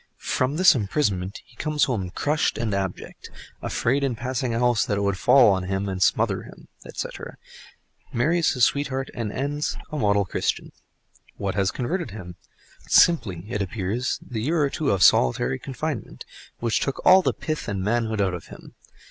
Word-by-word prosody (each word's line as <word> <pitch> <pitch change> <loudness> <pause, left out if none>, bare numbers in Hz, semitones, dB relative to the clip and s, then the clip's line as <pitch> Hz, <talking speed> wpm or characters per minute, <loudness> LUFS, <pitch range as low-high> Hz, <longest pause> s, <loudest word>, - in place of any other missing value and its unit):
From 130 +3 -1
this 185 +1 +7
imprisonment 100 -5 -1
he 120 - -23
comes 150 0 0
home 110 -8 -1
crushed 150 - 0
and 110 -3 -2
abject, 95 -2 -5 0.3
"afraid 135 +4 0
in 135 -4 0
passing 125 +1 -2
a 115 - -1
house 120 -2 +2
that 100 - -1
it - - -1
would 100 -1 +1
fall 120 -8 +6
and 95 0 -3
smother - - +2
him," - - -14 0.2
etc., - - -7 0.7
marries 160 +8 +2
his 125 -3 +4
sweetheart 135 -2 -2
and 115 -4 -4
ends 145 +5 -2
a 155 - -3
model 100 -3 +2
Christian. - - -2 0.7
What 100 -1 -2
has 95 -1 +1
converted 150 - -3
him? 90 -4 -9 0.5
Simply, 100 - +3
it 110 -3 -3
appears, 105 +5 -2
the 115 -4 -4
year 155 +5 +1
or 140 - 0
two 150 -3 -1
of 95 -2 +2
solitary 65 +1 +3
confinement—which 130 -4 -5
took 135 - -3
all 190 +1 +8
the - - +1
pith 155 -1 -4
and 100 -4 -2
manhood 110 0 0
out 95 -2 +1
of 90 - -7
him. - - -13
115 Hz, 165 wpm, -24 LUFS, 100-140 Hz, 0.7 s, all